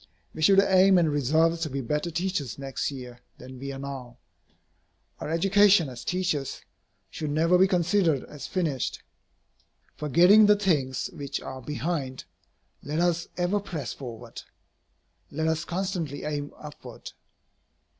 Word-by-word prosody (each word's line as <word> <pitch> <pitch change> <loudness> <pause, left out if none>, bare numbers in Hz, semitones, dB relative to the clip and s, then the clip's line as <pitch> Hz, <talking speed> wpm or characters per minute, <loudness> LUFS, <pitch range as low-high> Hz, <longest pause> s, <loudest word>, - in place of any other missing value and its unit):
We 155 - -7
should 195 +5 +6
aim 190 -1 +5
and 165 -3 +3
resolve 160 +4 +2
to 160 -1 -2
be 135 0 -3
better 150 +6 -2
teachers 165 - -2
next 135 -1 -3
year 125 -3 -9 0.2
than 130 0 -11
we 140 +1 -5
are 135 - -7
now. 135 -3 -7 1.0
Our - - -5
education 195 0 +4
as 125 -1 -9
teachers 180 -7 -2 0.5
should 155 - -4
never 165 +4 +3
be 185 +2 +5
considered 175 -5 +2
as 150 - -9
finished. 160 -9 -2 0.9
Forgetting 175 +9 +5
the 210 - +6
things 160 -6 0
which 145 -4 -4
are 130 -1 -8
behind, 135 0 -3 0.6
let 150 +2 -4
us 170 -1 +1
ever 180 +3 +1
press 170 -10 -5
forward. 120 -3 -9 0.9
Let 160 +2 -2
us 160 +1 0
constantly 175 -5 -3
aim 145 -1 -3
upward. 145 -6 -10
155 Hz, 135 wpm, -26 LUFS, 135-180 Hz, 1.0 s, should